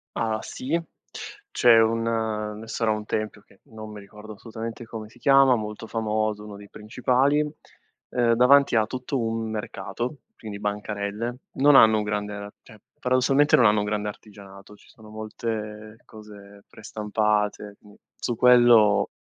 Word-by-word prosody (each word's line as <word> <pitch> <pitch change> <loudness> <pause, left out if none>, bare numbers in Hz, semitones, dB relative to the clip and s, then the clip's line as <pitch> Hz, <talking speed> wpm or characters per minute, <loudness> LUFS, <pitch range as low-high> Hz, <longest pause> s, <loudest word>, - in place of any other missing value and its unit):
Ah, 110 -1 -1
sì, 150 +6 -3 0.7
c'è 120 -2 +5
un 115 +1 +1 0.6
ne 110 - -10
sarà 110 0 -1
un 105 0 -2
tempio 110 -1 -4
che 100 - -26
non 110 -1 -11
mi 105 - -9
ricordo 105 +2 -12
assolutamente 115 +2 -8
come 110 -1 -8
si - - -20
chiama, 135 0 +5
molto 110 0 -6
famoso, 110 -1 -2
uno 105 - -9
dei 100 0 -13
principali, 125 +6 +1 0.7
uhm, 120 -2 +2
davanti 130 +2 +5
ha 110 -1 +3
tutto 130 +3 -4
un 115 -1 -2
mercato, 120 +4 -5 0.2
quindi 105 -2 -8
bancarelle. 105 +3 -4 0.2
Non 145 +1 +4
hanno 110 -4 +7
un 105 - -1
grande 105 0 -3
ar 100 0 -8
cioè, 110 - -17 0.2
paradossalmente 130 +3 +3
non 120 - +4
hanno 105 0 +4
un 105 - -1
grande 105 0 -2
artigianato, 100 -1 -13
ci - - -22
sono 110 -1 -17
molte 110 0 -6
cose 100 -2 -14
prestampate, 105 -1 -2
mhmm, 105 -1 -18 0.2
su 120 - -3
quello 120 -4 +5
110 Hz, 155 wpm, -24 LUFS, 105-120 Hz, 0.7 s, hanno